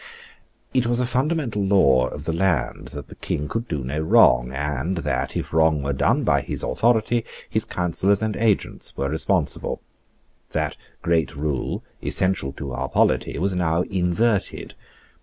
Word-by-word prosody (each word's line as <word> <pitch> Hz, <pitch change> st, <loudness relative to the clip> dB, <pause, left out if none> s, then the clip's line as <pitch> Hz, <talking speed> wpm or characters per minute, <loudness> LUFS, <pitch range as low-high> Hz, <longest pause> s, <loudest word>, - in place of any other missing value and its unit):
It 125 Hz, -2 st, +2 dB
was 120 Hz, 0 st, +1 dB
a 125 Hz, -, +2 dB
fundamental 130 Hz, -4 st, 0 dB
law 70 Hz, -11 st, +4 dB
of 75 Hz, +3 st, -7 dB
the 80 Hz, -, -1 dB
land 85 Hz, -5 st, 0 dB
that 70 Hz, -3 st, -8 dB
the -, -, -10 dB
King 75 Hz, -, -3 dB
could 115 Hz, +6 st, -3 dB
do 75 Hz, -, -3 dB
no 70 Hz, +4 st, -3 dB
wrong, 60 Hz, -5 st, +5 dB
and 75 Hz, +5 st, -2 dB
that, 85 Hz, -, -2 dB
if -, -, -5 dB
wrong 80 Hz, -2 st, +3 dB
were 70 Hz, 0 st, -1 dB
done 65 Hz, -, +2 dB
by -, -, +3 dB
his -, -, -3 dB
authority, 115 Hz, 0 st, +2 dB, 0.2 s
his -, -, -1 dB
counsellors 95 Hz, +4 st, 0 dB
and 110 Hz, -1 st, -1 dB
agents 110 Hz, -3 st, 0 dB
were 70 Hz, -, -1 dB
responsible. 80 Hz, +2 st, -1 dB, 0.7 s
That -, -, -1 dB, 0.3 s
great 80 Hz, -5 st, +1 dB
rule, 70 Hz, -2 st, -2 dB, 0.2 s
essential 95 Hz, -8 st, 0 dB
to 70 Hz, -1 st, -6 dB
our 60 Hz, -, -3 dB
polity, -, -, +1 dB
was 95 Hz, +2 st, 0 dB
now 85 Hz, -1 st, +1 dB
inverted. 95 Hz, +4 st, 0 dB
85 Hz, 160 wpm, -23 LUFS, 70-105 Hz, 0.7 s, wrong